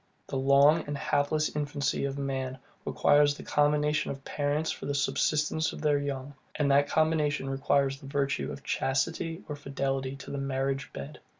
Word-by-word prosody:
The -, -, -6 dB
long 140 Hz, +4 st, +5 dB
and 145 Hz, 0 st, -3 dB
helpless 150 Hz, +1 st, 0 dB
infancy 145 Hz, -2 st, -1 dB
of 140 Hz, 0 st, -3 dB
man 135 Hz, -2 st, -3 dB, 0.3 s
requires 145 Hz, 0 st, +4 dB
the -, -, -9 dB
combination 150 Hz, +1 st, +2 dB
of 135 Hz, 0 st, -6 dB
parents 145 Hz, +2 st, -1 dB
for -, -, -6 dB
the 145 Hz, -, -1 dB
subsistence 155 Hz, +2 st, +1 dB
of -, -, -8 dB
their 150 Hz, -2 st, +3 dB
young; 140 Hz, -1 st, -4 dB, 0.2 s
and 145 Hz, -2 st, +2 dB
that 145 Hz, +1 st, +4 dB
combination 155 Hz, -3 st, +1 dB
requires 135 Hz, 0 st, +1 dB
the 140 Hz, -, -11 dB
virtue 140 Hz, +1 st, -1 dB
of 140 Hz, -, -8 dB
chastity 160 Hz, +6 st, -1 dB
or 150 Hz, -, -4 dB
fidelity 135 Hz, -1 st, -2 dB
to 140 Hz, -, -9 dB
the 140 Hz, -, -3 dB
marriage 135 Hz, 0 st, -2 dB
bed. 70 Hz, 0 st, -8 dB
140 Hz, 170 wpm, -29 LUFS, 135-150 Hz, 0.3 s, long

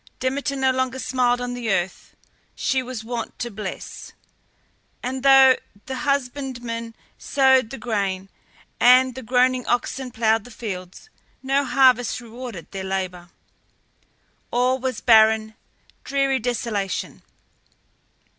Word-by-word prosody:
Demeter 275 Hz, +2 st, -1 dB
no 265 Hz, -1 st, +2 dB
longer 260 Hz, 0 st, -1 dB
smiled 250 Hz, -2 st, +1 dB
on 245 Hz, 0 st, -4 dB
the 240 Hz, -3 st, -2 dB
earth 185 Hz, -1 st, -2 dB, 0.4 s
she 265 Hz, -, 0 dB
was 250 Hz, -3 st, -6 dB
wont 230 Hz, 0 st, -5 dB
to 240 Hz, -1 st, -4 dB
bless, 200 Hz, -2 st, -7 dB, 0.9 s
and 260 Hz, +1 st, -3 dB
though 270 Hz, -1 st, +7 dB, 0.3 s
the 265 Hz, -, -5 dB
husbandman 250 Hz, -5 st, -3 dB, 0.2 s
sowed 265 Hz, -4 st, +3 dB
the 270 Hz, -, -7 dB
grain, 200 Hz, -5 st, -2 dB, 0.5 s
and 255 Hz, +1 st, +6 dB
the 260 Hz, -, -7 dB
groaning 250 Hz, +1 st, +2 dB
oxen 250 Hz, +2 st, -1 dB
ploughed 225 Hz, -2 st, +1 dB
the 245 Hz, -, -13 dB
fields, 200 Hz, -, -8 dB, 0.3 s
no 275 Hz, +1 st, +2 dB
harvest 255 Hz, -3 st, +3 dB
rewarded 235 Hz, -5 st, -9 dB
their 195 Hz, -1 st, -5 dB
labour. 185 Hz, -2 st, -4 dB, 1.2 s
All 250 Hz, +2 st, +1 dB
was 255 Hz, -2 st, -3 dB
barren, 220 Hz, -1 st, +5 dB, 0.5 s
dreary 275 Hz, -1 st, +1 dB
desolation. 225 Hz, -5 st, -3 dB
245 Hz, 115 wpm, -23 LUFS, 220-260 Hz, 1.2 s, though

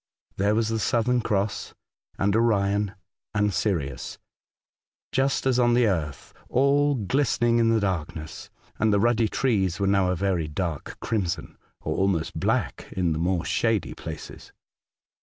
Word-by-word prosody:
There 100 Hz, +2 st, +2 dB
was 110 Hz, 0 st, +1 dB
the 115 Hz, 0 st, -1 dB
Southern 120 Hz, +4 st, +1 dB
Cross 105 Hz, -2 st, -2 dB, 0.4 s
and 100 Hz, +1 st, +1 dB
Orion 100 Hz, -3 st, +2 dB, 0.4 s
and 105 Hz, -1 st, +2 dB
Sirius, 75 Hz, -, -2 dB, 0.9 s
just 135 Hz, +1 st, +1 dB
as 130 Hz, -1 st, +3 dB
on 120 Hz, -1 st, +4 dB
the 120 Hz, -1 st, +4 dB
earth, 80 Hz, -9 st, -2 dB, 0.2 s
all 140 Hz, +2 st, +3 dB
glistening 120 Hz, +1 st, +1 dB
in 115 Hz, -1 st, +3 dB
the 115 Hz, 0 st, +3 dB
darkness, 80 Hz, -5 st, -4 dB, 0.3 s
and 110 Hz, 0 st, +3 dB
the 100 Hz, -, +3 dB
ruddy 115 Hz, +1 st, +3 dB
trees 100 Hz, -8 st, 0 dB
were 100 Hz, -, +1 dB
now 95 Hz, -1 st, +3 dB
a 90 Hz, -, +1 dB
very 90 Hz, -4 st, 0 dB
dark 75 Hz, -1 st, -4 dB
crimson, 95 Hz, -7 st, -2 dB, 0.3 s
or 80 Hz, -, -2 dB
almost 95 Hz, -4 st, 0 dB
black -, -, -1 dB
in 90 Hz, -3 st, 0 dB
the 80 Hz, -, -3 dB
more 85 Hz, 0 st, 0 dB
shady -, -, 0 dB
places. -, -, -9 dB
100 Hz, 145 wpm, -25 LUFS, 90-115 Hz, 0.9 s, on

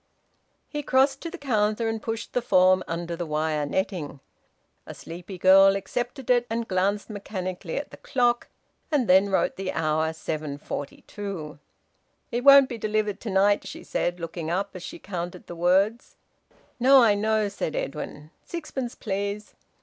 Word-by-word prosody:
He 295 Hz, -, -4 dB
crossed 270 Hz, 0 st, +2 dB
to 335 Hz, -, -4 dB
the 365 Hz, -, -8 dB
counter, 220 Hz, -5 st, 0 dB
and 225 Hz, -1 st, -2 dB
pushed 225 Hz, 0 st, -5 dB
the 245 Hz, -, +1 dB
form 185 Hz, -4 st, +4 dB
under 170 Hz, +1 st, -3 dB
the 175 Hz, -, -4 dB
wire 155 Hz, -1 st, -1 dB
netting. 170 Hz, -4 st, -3 dB, 0.7 s
A -, -, -8 dB
sleepy 175 Hz, +3 st, -9 dB
girl 195 Hz, +2 st, +7 dB
accepted 245 Hz, +5 st, -3 dB
it, 245 Hz, -1 st, +3 dB
and 230 Hz, 0 st, -2 dB
glanced 195 Hz, +2 st, 0 dB
mechanically 185 Hz, -4 st, -5 dB
at 290 Hz, -, -4 dB
the -, -, -11 dB
clock, 240 Hz, -2 st, +1 dB, 0.4 s
and 275 Hz, -6 st, +2 dB
then 190 Hz, +2 st, +5 dB
wrote 190 Hz, -, +1 dB
the 190 Hz, -1 st, -3 dB
hour 155 Hz, 0 st, 0 dB
7:42. 155 Hz, +3 st, -6 dB, 0.7 s
"It 240 Hz, +1 st, -1 dB
won't 275 Hz, -1 st, +9 dB
be 235 Hz, -3 st, -6 dB
delivered 215 Hz, -1 st, -1 dB
to 230 Hz, -, -6 dB
night," 200 Hz, +1 st, +3 dB
she -, -, -8 dB
said, 175 Hz, 0 st, -2 dB
looking 165 Hz, -1 st, -5 dB
up, 195 Hz, +3 st, -1 dB
as 185 Hz, -, -8 dB
she -, -, -7 dB
counted 180 Hz, -2 st, -6 dB
the 175 Hz, -, -8 dB
words. 190 Hz, +7 st, +1 dB, 0.6 s
"No, 260 Hz, +1 st, +7 dB
I 215 Hz, -3 st, +5 dB
know," 215 Hz, +1 st, +1 dB
said 195 Hz, -5 st, -4 dB
Edwin. 150 Hz, +1 st, -5 dB
"Sixpence, 290 Hz, -7 st, -5 dB
please." 200 Hz, +1 st, -4 dB
200 Hz, 155 wpm, -26 LUFS, 175-230 Hz, 0.7 s, won't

